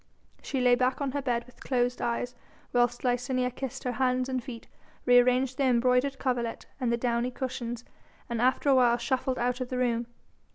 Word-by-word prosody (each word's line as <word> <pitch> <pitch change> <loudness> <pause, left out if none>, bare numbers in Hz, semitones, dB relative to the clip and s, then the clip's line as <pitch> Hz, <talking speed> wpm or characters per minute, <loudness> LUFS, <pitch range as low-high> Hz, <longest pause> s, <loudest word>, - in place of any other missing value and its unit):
She 265 -3 -2
lay 250 -1 +5
back 255 +1 +2
on 280 -2 -1
her 285 +1 -2
bed 240 -3 -1
with 250 - -19
closed 245 -1 0
eyes 240 +1 -1 0.4
whilst 245 0 +2
Licinia 250 0 0
kissed 265 +1 -6
her 250 - -1
hands 255 0 0
and 255 -2 -2
feet, 240 -3 -9 0.4
re 245 0 +7
arranged 255 +1 +2
the 275 - +3
embroidered 250 +2 +2
coverlet 245 -3 -2
and 250 -3 0
the 235 - +2
downy 240 0 0
cushions, 245 -2 -5 0.4
and 235 -1 -2
after 255 +3 +2
a - - +6
while 245 -2 +4
shuffled 255 +1 -1
out 245 +1 -1
of 250 - -3
the 255 - -3
room. 235 -2 0
250 Hz, 195 wpm, -28 LUFS, 240-255 Hz, 0.4 s, re